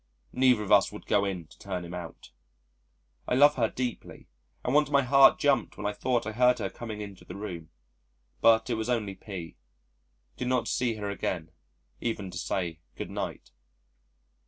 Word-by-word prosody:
Neither 125 Hz, -4 st, +4 dB
of 105 Hz, -, -5 dB
us -, -, +5 dB
would -, -, -10 dB
go 100 Hz, -, +2 dB
in 95 Hz, -4 st, -3 dB
to -, -, -20 dB
turn 90 Hz, -3 st, -4 dB
him 85 Hz, -, -8 dB
out. 85 Hz, -7 st, -8 dB, 1.0 s
I -, -, +1 dB
love 145 Hz, +3 st, +7 dB
her 115 Hz, -5 st, +1 dB
deeply 125 Hz, -2 st, -5 dB, 0.4 s
and 125 Hz, -, 0 dB
once 150 Hz, -1 st, +4 dB
my 140 Hz, -1 st, +4 dB
heart 135 Hz, +2 st, +6 dB
jumped 135 Hz, -5 st, +1 dB
when 105 Hz, -, -6 dB
I 105 Hz, -, 0 dB
thought 120 Hz, +1 st, 0 dB
I 110 Hz, -, -3 dB
heard 125 Hz, +2 st, +4 dB
her 95 Hz, -, -3 dB
coming 110 Hz, 0 st, -6 dB
into 100 Hz, -2 st, -9 dB
the 90 Hz, -, -9 dB
room. 90 Hz, -6 st, -6 dB, 0.7 s
But 115 Hz, +1 st, +5 dB
it -, -, +2 dB
was 110 Hz, +1 st, -2 dB
only 110 Hz, -5 st, 0 dB
P. 95 Hz, -4 st, -8 dB, 0.8 s
Did 125 Hz, -, -3 dB
not 125 Hz, -2 st, +1 dB
see 120 Hz, -3 st, 0 dB
her 105 Hz, -1 st, -4 dB
again 80 Hz, -5 st, -3 dB, 0.5 s
even 105 Hz, -5 st, -3 dB
to 90 Hz, -, -5 dB
say 85 Hz, -2 st, -2 dB, 0.2 s
"Good -, -, -6 dB
night." -, -, -5 dB
110 Hz, 180 wpm, -28 LUFS, 95-125 Hz, 1.0 s, love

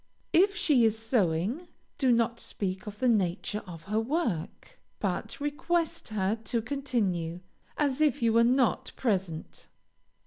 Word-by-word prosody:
If 395 Hz, +4 st, +5 dB
she 280 Hz, -, +3 dB
is 220 Hz, -1 st, +3 dB
sewing, 225 Hz, -, 0 dB, 0.3 s
do 260 Hz, -3 st, +4 dB
not 235 Hz, 0 st, +2 dB
speak 190 Hz, -2 st, -4 dB
of 210 Hz, 0 st, -7 dB
the 255 Hz, -, +1 dB
nature 210 Hz, -1 st, +1 dB
of 165 Hz, -3 st, -9 dB
her 210 Hz, +4 st, 0 dB
work, 250 Hz, -, -3 dB, 0.2 s
but -, -, -3 dB
request 325 Hz, +3 st, -1 dB
her 210 Hz, 0 st, 0 dB
to 230 Hz, +3 st, 0 dB
continue, 205 Hz, -, -1 dB, 0.4 s
as 285 Hz, -1 st, +1 dB
if 300 Hz, -5 st, +3 dB
you 230 Hz, -1 st, +2 dB
were 230 Hz, +1 st, +6 dB
not 250 Hz, 0 st, +2 dB
present. 190 Hz, -9 st, -2 dB
230 Hz, 140 wpm, -29 LUFS, 195-275 Hz, 0.4 s, were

